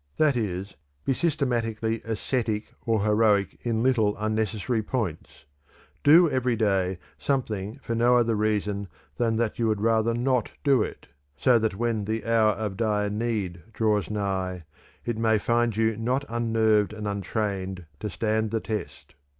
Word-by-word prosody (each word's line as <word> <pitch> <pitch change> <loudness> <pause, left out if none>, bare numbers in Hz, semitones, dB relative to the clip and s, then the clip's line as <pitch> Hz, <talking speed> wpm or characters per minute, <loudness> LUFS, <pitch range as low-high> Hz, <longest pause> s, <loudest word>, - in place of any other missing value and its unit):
That 150 -3 +3
is, 100 -4 -3 0.3
be 135 - +2
systematically 115 -7 -1
ascetic 110 -1 -2
or 110 -3 +2
heroic 105 -2 +2
in 115 -1 0
little, 110 -5 +2
unnecessary 110 +1 -1
points; 105 - -4 0.6
do 165 +4 +7
every 130 -4 +1
day 95 -4 +1 0.2
something 110 - -2
for 115 - -2
no 120 +2 +4
other 115 -1 +2
reason 105 -1 0 0.3
than 115 -2 +1
that 115 0 -1
you 115 - +2
would 110 -2 +1
rather 115 +1 +2
not 125 -1 0
do 140 -4 +4
it, - - -4 0.3
so 125 -2 +4
that 110 -3 0
when 115 -1 -1
the 110 +2 -2
hour 115 -2 +3
of 105 -2 -4
dire 105 -2 0
need 105 -6 -2
draws 105 -4 +1
nigh, 95 -4 -2 0.4
it 120 -2 -2
may 110 -1 +3
find 115 +1 +1
you 110 0 +2
not 125 +5 -1
unnerved 110 -3 +2
and 105 -1 -5
untrained 100 -2 -3
to 105 - -3
stand 110 +1 0
the 115 +1 -1
test. 105 -9 -6
110 Hz, 150 wpm, -26 LUFS, 105-115 Hz, 0.6 s, do